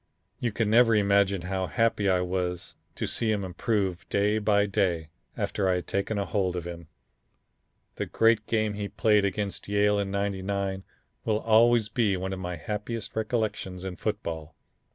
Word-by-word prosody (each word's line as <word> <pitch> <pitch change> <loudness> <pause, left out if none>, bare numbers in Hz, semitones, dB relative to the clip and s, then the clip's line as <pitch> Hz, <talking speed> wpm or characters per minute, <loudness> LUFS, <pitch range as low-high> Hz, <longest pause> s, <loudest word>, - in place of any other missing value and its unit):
You 120 - -1
can 110 +1 0
never 115 0 +6
imagine 100 -2 +3
how 95 +1 -2
happy 115 -3 +1
I 90 -1 +3
was 90 -1 -2 0.2
to - - -2
see 115 -2 0
him 105 -2 0
improve 95 0 -2
day 105 +2 +2
by 105 -1 +3
day 95 -6 0 0.3
after 95 -2 0
I 90 - +3
had 90 -1 -3
taken 100 +2 -1
a 100 - 0
hold 90 0 0
of 85 -1 -4
him. 85 -2 -7 1.1
The - - -2
great 115 -1 +3
game 110 -2 +1
he 100 0 -3
played 105 -1 +3
against 100 +1 -3
Yale 105 0 +2
in 100 -1 -1
'99 100 -1 -2 0.4
will 110 0 0
always 115 0 +4
be 110 -4 +1
one 95 +1 -3
of 95 - -5
my 90 -1 -4
happiest 105 +6 -5
recollections 105 -5 -2
in 95 -1 -4
football. 85 -7 -4
100 Hz, 170 wpm, -27 LUFS, 95-110 Hz, 1.1 s, never